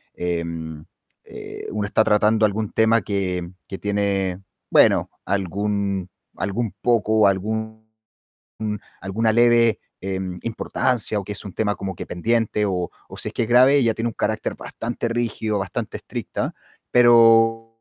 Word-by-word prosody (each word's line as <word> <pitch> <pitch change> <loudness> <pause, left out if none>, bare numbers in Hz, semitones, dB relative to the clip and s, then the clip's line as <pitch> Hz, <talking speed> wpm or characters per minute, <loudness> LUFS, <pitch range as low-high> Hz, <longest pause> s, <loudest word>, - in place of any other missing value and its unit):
em, 85 -3 -4 0.4
eh, - - -9
uno 105 -1 -2
está 110 - +3
tratando 110 +1 +3
algún 105 0 -3
tema 110 0 +3
que 95 -3 -2 0.2
que 95 - -6
tiene, 100 -2 -1 0.3
bueno, - - +4
algún 100 0 -1 0.3
algún 105 +3 -2
poco, 110 -3 +3
algún 110 +3 -2 1.2
alguna 110 +3 +1
leve, 120 -2 +4 0.2
em, 95 -1 -4
importancia 115 -1 0
o - - -8
que 105 - -5
es 100 - -6
un 100 - -7
tema 105 0 0
como 95 -1 -5
que - - -7
pendiente 110 +3 0
o 90 -3 -1 0.2
o - - -11
si - - -2
es - - -10
que - - 0
es 110 - -2
grave, 130 +4 +6
ella 115 -5 +3
tiene 115 +2 -2
un 115 - -7
carácter - - -2
bastante 115 0 -4
rígido, 115 -2 -1
bastante 95 0 -4
estricta, - - -4 0.4
pero 115 -1 +6
105 Hz, 145 wpm, -22 LUFS, 95-115 Hz, 1.2 s, grave